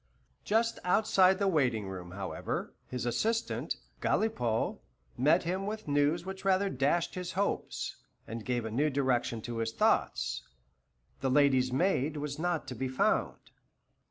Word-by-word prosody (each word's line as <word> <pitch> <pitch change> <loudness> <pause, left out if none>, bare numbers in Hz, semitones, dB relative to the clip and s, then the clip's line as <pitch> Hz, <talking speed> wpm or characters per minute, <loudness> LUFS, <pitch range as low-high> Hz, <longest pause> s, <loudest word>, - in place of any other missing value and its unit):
Just 230 +2 +1
outside 190 0 +4
the 200 0 +1
waiting 125 - +1
room, 90 -2 -7
however, 95 +1 -4
his 125 -1 -4
assistant, 225 - 0 0.3
Galipaud, 120 - 0 0.4
met 150 +8 +4
him 185 +3 -2
with 215 -3 -5
news 145 +4 +2
which 190 0 -6
rather 195 0 +2
dashed 145 +6 +1
his 180 -1 -4
hopes, 200 +2 -2 0.3
and 115 0 -5
gave 120 -1 -1
a 110 - -4
new 145 +7 +2
direction 125 -5 0
to 120 -1 -4
his 115 0 -1
thoughts. - - +1 0.8
The 135 - 0
lady's 130 -2 +4
maid 155 0 +1
was 145 0 -4
not 175 -1 -1
to - - -4
be 130 +2 -2
found. 130 0 0
145 Hz, 145 wpm, -31 LUFS, 120-185 Hz, 0.8 s, outside